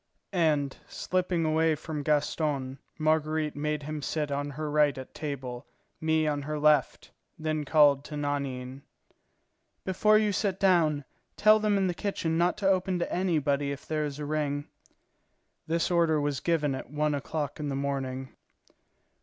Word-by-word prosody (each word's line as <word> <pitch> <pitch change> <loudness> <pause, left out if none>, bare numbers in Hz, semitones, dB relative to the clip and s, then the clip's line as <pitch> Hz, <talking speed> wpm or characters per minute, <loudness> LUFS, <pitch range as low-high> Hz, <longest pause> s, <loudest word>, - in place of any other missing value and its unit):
And, 150 -6 +1
slipping 180 -2 -1
away 160 0 +2
from 150 0 -5
Gaston, 145 -2 0 0.2
Marguerite 155 0 +1
made 150 0 -2
him 155 +1 -4
sit 150 0 -2
on 145 +1 -2
her 150 +2 -4
right 150 -2 +3
at 130 - -8
table, 130 -5 -5 0.3
me 160 0 +2
on 145 -1 0
her 150 +2 -3
left, 150 0 +2 0.3
then 155 -1 -2
called 145 -2 +5
to 150 - -6
Nanine: 140 -2 -3 1.0
"Before 210 +3 +4
you 215 -1 +2
sit 195 -1 -1
down, 160 -7 +3 0.3
tell 215 0 +6
them 210 -1 +2
in 195 - +2
the 180 - 0
kitchen 175 -4 -2
not 175 +3 +2
to 200 -2 0
open 185 -1 +2
to 175 - -2
anybody 145 -6 +1
if 140 +1 -7
there 155 -1 -1
is 145 -2 -4
a 150 - -4
ring." 145 -1 -1 1.0
This 165 +2 0
order 165 -3 +3
was 145 -2 -1
given 150 -5 +1
at 130 - -6
one 150 +1 0
o'clock 145 +1 -3
in 150 -1 -3
the 135 - -2
morning. 135 -1 -3
150 Hz, 160 wpm, -28 LUFS, 145-165 Hz, 1.0 s, tell